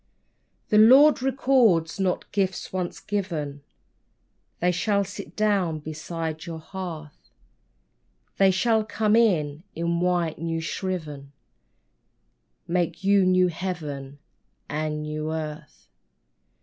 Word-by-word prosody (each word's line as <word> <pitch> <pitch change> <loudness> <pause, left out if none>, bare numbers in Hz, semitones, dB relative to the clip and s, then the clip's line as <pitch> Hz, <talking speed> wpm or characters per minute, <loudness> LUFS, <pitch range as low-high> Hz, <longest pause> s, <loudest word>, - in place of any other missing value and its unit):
The 210 - +5
Lord 265 +7 +7
recalls 250 -11 +2
not 185 -2 -1
gifts 190 -2 -2
once 180 -2 -3
given: 160 -9 -3 1.0
They 180 +1 +2
shall 200 +3 +1
sit 195 - -9
down 200 -7 +1
beside 160 +1 -5
your 165 -1 -5
hearth; 160 -3 -8 1.1
They 195 -1 +6
shall 220 +4 +2
come 215 0 +1
in, 160 -10 +2
in 170 +1 -1
white, 175 -3 0
new 165 0 -2
shriven, 155 -5 -5 1.3
Make 175 +1 -1
you 195 -1 +4
new 185 0 +4
Heaven 150 -6 -5 0.5
and 155 +1 -2
a - - -3
new 150 +1 -4
earth. 155 -1 -7
175 Hz, 110 wpm, -25 LUFS, 155-195 Hz, 1.3 s, Lord